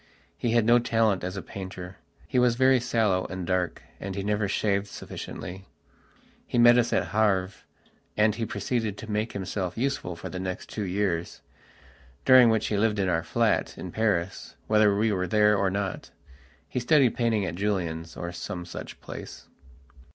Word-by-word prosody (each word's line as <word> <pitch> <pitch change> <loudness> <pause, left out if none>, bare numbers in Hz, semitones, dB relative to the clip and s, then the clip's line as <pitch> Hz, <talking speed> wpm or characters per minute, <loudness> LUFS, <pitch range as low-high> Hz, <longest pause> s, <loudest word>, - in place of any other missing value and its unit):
He 120 -2 -1
had 115 -2 +3
no 120 +1 +6
talent 115 -6 +1
as 90 +2 -4
a 95 - -5
painter. 95 -1 -8 0.3
He 125 - +1
was 125 -1 +3
very 130 +1 +4
sallow 105 -6 +1
and 95 -1 -5
dark, 90 -1 -1 0.2
and 95 -1 -5
he 100 - -3
never 105 0 0
shaved 100 0 0
sufficiently. 95 -1 -8 0.8
He - - -2
met 120 +1 +7
us 120 - +1
at - - 0
Havre, 100 -4 +2 0.7
and 105 0 +4
he 115 +1 -3
proceeded 110 -2 -2
to 110 0 -7
make 105 +2 -1
himself 95 -1 -3
useful 125 -8 -2
for 85 - -7
the 90 - -6
next 95 -1 -5
two 105 - -4
years, 90 -3 -2 0.8
during 130 -2 +8
which 110 -1 +1
he 105 - 0
lived 105 0 +2
in 95 -2 +1
our 80 -2 +1
flat - - 0
in 90 - -7
Paris, 95 -4 -1
whether 105 -2 +4
we 110 +1 +2
were 90 -2 -1
there 105 0 +4
or 100 -1 +1
not. 100 -1 -3 0.6
He - - -2
studied 130 0 +4
painting 115 -4 +1
at 85 - -3
Julien's, 85 -4 -2
or 85 - -4
some 90 0 -6
such 85 - -8
place.... - - -9
100 Hz, 175 wpm, -27 LUFS, 95-115 Hz, 0.8 s, during